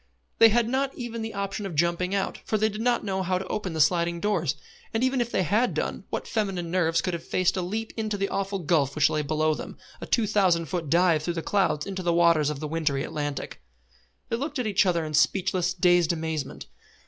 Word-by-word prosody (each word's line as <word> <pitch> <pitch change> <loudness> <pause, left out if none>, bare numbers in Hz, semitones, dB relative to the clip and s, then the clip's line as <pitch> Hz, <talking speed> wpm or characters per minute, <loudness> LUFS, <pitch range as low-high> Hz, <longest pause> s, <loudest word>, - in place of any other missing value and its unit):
They 225 - +9
had 230 +1 +2
not 265 +2 -1
even 235 -2 -5
the 220 -1 -5
option 200 +1 -3
of 175 - -7
jumping 175 +4 +1
out, 195 - -2
for 215 - 0
they 215 +1 +2
did 210 +1 -6
not 245 +1 +1
know 190 -1 -1
how 185 0 0
to 190 - -5
open 190 -2 -3
the 160 - -4
sliding 170 +2 +2
doors; 170 -7 0 0.4
and 225 - +1
even 260 -1 +2
if 235 - -1
they 190 - +1
had 220 +9 +1
done, - - -3
what - - -4
feminine 195 -6 -2
nerves 165 -2 +2
could 180 - -2
have 170 - -4
faced 185 +1 +1
a 185 - -1
leap 220 +5 -4
into 215 -2 -2
that 195 0 -2
awful 195 0 -1
gulf 150 -6 +1
which 145 -2 +3
lay 155 - 0
below 155 +1 +1
them, - - -7 0.2
a - - -6
two 230 - +2
thousand 190 -5 +2
foot 160 0 -4
dive 170 -1 +4
through 170 +2 -3
the 165 - -3
clouds 190 -7 +1
into 190 -1 -4
the 175 -1 +1
waters 170 -3 +4
of 150 -2 -4
the 155 - -4
wintry 150 -3 -1
Atlantic? 145 - -4 0.7
They 230 - 0
looked 290 +3 -4
at 250 - -1
each 205 -2 +2
other 170 -3 +1
in 155 - -6
speechless, 180 +4 +2
dazed 175 -2 +4
amazement. 160 -3 -4
180 Hz, 230 wpm, -26 LUFS, 160-210 Hz, 0.7 s, They